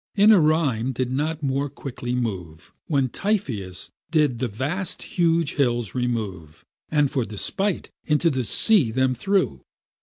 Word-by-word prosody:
Inarime 155 - +4
did 125 +1 -2
not 155 +3 -2
more 140 +1 0
quickly 125 -2 -5
move, 90 -10 -5
When 140 -4 +1
Typheus 115 - -2 0.2
did 150 -7 +2
the 125 - 0
vast 155 - -3
huge 165 -3 +1
hills 120 -7 0
remove, 105 -11 -4 0.2
And 145 -3 +2
for 130 - 0
despite 180 - -2
into 155 +2 +2
the 130 -2 -1
sea 165 - +4
them 130 +3 +1
threw. 180 - 0
130 Hz, 130 wpm, -23 LUFS, 115-160 Hz, 0.2 s, Inarime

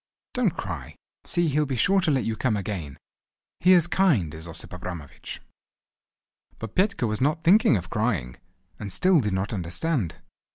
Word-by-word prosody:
Don't - - 0
cry! - - -6 0.3
See, 175 -1 +1
he'll 150 +1 +1
be 130 - -2
sure 195 +10 +3
to 165 - +1
let 135 -4 +2
you 115 - -2
come 110 -1 0
again. 95 -9 -5 0.6
He 185 +1 +6
is 175 -3 +6
kind 155 - +2
is 80 +2 -7
Osip 85 - -8
Abramovich." 90 -5 -7 1.1
But 115 -2 -7
Petka 195 - +1
was 110 0 -2
not 155 +4 +1
thinking 185 - +5
of 85 -2 -7
crying, 105 - -1 0.4
and 100 -2 -5
still 185 - +4
did 105 -6 -1
not 95 +4 -2
understand. 95 - -1
115 Hz, 165 wpm, -25 LUFS, -, 1.1 s, He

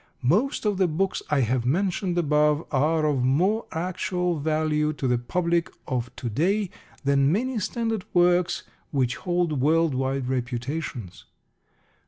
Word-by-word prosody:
Most 215 - +1
of 205 -2 +1
the 185 - +4
books 185 +4 -1
I 150 -3 +3
have 125 0 +1
mentioned 180 - 0
above 150 -1 +2
are 155 +3 +2
of 140 -4 +1
more 185 - +2
actual 180 0 -1
value 155 0 +1
to 140 -3 -2
the 125 -1 +2
public 170 +6 0 0.2
of 125 -1 -2
to 125 - -5
day 180 - 0 0.3
than 140 0 +3
many 245 +5 0
standard 225 -1 -2
works 175 0 +3 0.3
which 130 -4 0
hold 175 -6 0
world 160 +1 +3
wide 130 0 -1
reputations. 125 - -4
155 Hz, 140 wpm, -25 LUFS, 135-180 Hz, 0.3 s, the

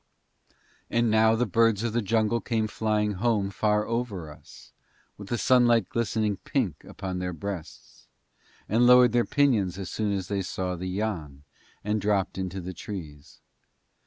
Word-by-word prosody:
And 115 -1 +1
now 110 +1 +4
the 120 +2 +1
birds 115 0 +2
of 115 -2 -1
the 120 - +1
jungle 115 +2 +1
came 110 -2 -1
flying 105 -1 0
home 110 -5 +1
far 105 +1 +1
over 110 -9 -3
us, 75 - -16 0.4
with 100 - -10
the 120 - -1
sunlight 120 -4 +4
glistening 110 -3 -1
pink 105 - -2
upon 95 -2 -5
their 90 0 -3
breasts, 85 0 -8 0.6
and 120 +4 +3
lowered 125 -1 +7
their 120 0 +2
pinions 115 - +1
as 95 -2 -6
soon 105 -2 -1
as 95 -2 -2
they 100 -1 -1
saw 90 0 -3
the 90 +2 -5
Yann, 90 -9 -4 0.4
and 105 +1 -1
dropped 100 -2 0
into 95 0 -4
the 90 +1 -6
trees. 80 -6 -9
105 Hz, 160 wpm, -26 LUFS, 95-115 Hz, 0.6 s, lowered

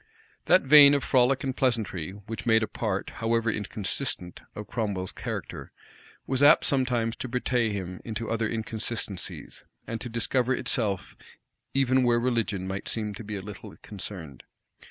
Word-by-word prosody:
[*] - - -30
* - - -34
Bates. - - -34
That - - +6
vein 145 0 +9
of 140 - 0
frolic 130 0 +3
and 130 -2 -2
pleasantry 110 - 0
which 105 +3 -8
made 110 -1 +4
a - - -1
part, 100 -4 -3
however 115 0 +1
inconsistent, 105 -2 -4
of 105 - -6
Cromwell's 100 -6 -3
character, - - -6 0.5
was 130 0 -1
apt 145 +3 +7
sometimes 125 -4 +1
to - - -4
betray 125 -1 0
him 95 -3 -5
into 115 0 -4
other 115 -1 -1
inconsistencies, 110 -3 -4 0.2
and 115 -1 -5
to 120 - -5
discover 125 +2 +1
itself 100 -9 -2 0.6
even 130 -1 +3
where 120 -1 +3
religion 115 -6 -1
might 95 +1 -4
seem 105 -2 -2
to 115 - -8
be 105 0 -5
a 95 - -5
little 105 -1 -10
concerned. 90 - -7
115 Hz, 165 wpm, -27 LUFS, 100-125 Hz, 0.6 s, vein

